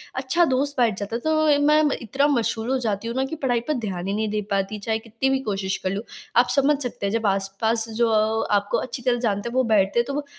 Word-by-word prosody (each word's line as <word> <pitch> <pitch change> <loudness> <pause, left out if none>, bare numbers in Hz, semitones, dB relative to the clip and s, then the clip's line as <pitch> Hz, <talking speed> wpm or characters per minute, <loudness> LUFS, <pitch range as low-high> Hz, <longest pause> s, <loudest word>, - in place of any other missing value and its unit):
अच्छा 265 +7 +2
दोस्त 280 +1 0
बैठ 230 -6 +2
जाता 200 +3 -4
है - - -1
तो 310 -1 +3
मैं 305 +1 +5 0.2
इतना 270 +5 +1
मशहूर 235 -4 0
हो 265 - +2
जाती 220 -2 -2
हूँ 235 - -4
ना, 265 +1 +1
कि 275 - -5
पढ़ाई 255 -5 0
पर 305 - +1
ध्यान 195 -8 -4
ही 195 - -1
नहीं 215 +1 -1
दे 210 0 -1
पाती 195 +2 -1
चाहे 220 +2 -1
कितनी 230 +4 -2
भी 270 0 +1
कोशिश 195 -1 -2
कर 185 - 0
लूँ। 200 +3 -3 0.3
आप 245 +1 +5
समझ 280 +1 +3
सकते 240 -5 -4
हैं 200 - -1
जब 225 -1 -1
आस-पास 200 +4 0
जो 230 +1 +1
अ, 220 0 +1
आपको 205 0 +1
अच्छी 250 0 -5
तरह 245 0 +2
से - - -4
जानते 210 -1 -1
हैं 245 - -8
वो 260 - +3
बैठते 200 +3 +3
हैं 235 - +2
तो 280 - -3
वो 290 +1 -3
230 Hz, 265 wpm, -23 LUFS, 205-265 Hz, 0.3 s, मैं